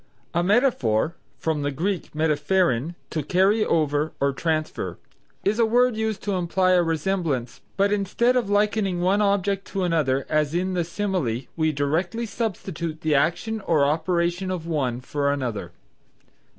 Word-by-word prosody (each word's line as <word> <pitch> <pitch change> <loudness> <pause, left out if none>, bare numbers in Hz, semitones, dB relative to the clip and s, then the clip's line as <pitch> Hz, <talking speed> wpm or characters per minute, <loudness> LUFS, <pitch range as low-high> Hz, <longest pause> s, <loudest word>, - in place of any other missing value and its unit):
A 170 - +2
Metaphor 175 - +2 0.2
(from 160 -2 -1
the 145 - 0
Greek 175 +6 -2
metapherein, 155 -1 +1 0.2
to 155 - -1
carry 190 +8 +3
over 150 -3 +1
or 140 0 +1
transfer), 155 +1 -2 0.5
is 210 +4 +1
a 230 - +5
word 245 +1 +3
used 220 -2 -2
to 205 - -1
imply 185 +1 +1
a 180 -1 +5
resemblance 165 -6 -1 0.2
but 200 +1 +3
instead 210 +5 +1
of 240 -5 +1
likening 205 -3 +1
one 190 +4 +2
object 200 -1 +1
to 195 - -2
another 145 -6 +1
as 155 0 +1
in 185 +2 0
the 175 -1 +1
simile 170 - -2
we 160 -1 +1
directly 165 +10 -1
substitute 175 -8 -4
the 155 -1 +1
action 175 +10 +1
or 155 -4 +4
operation 170 +4 0
of 180 -3 -3
one 130 -7 -1
for 140 +2 -1
another. 120 -11 -3
170 Hz, 150 wpm, -24 LUFS, 150-195 Hz, 0.5 s, a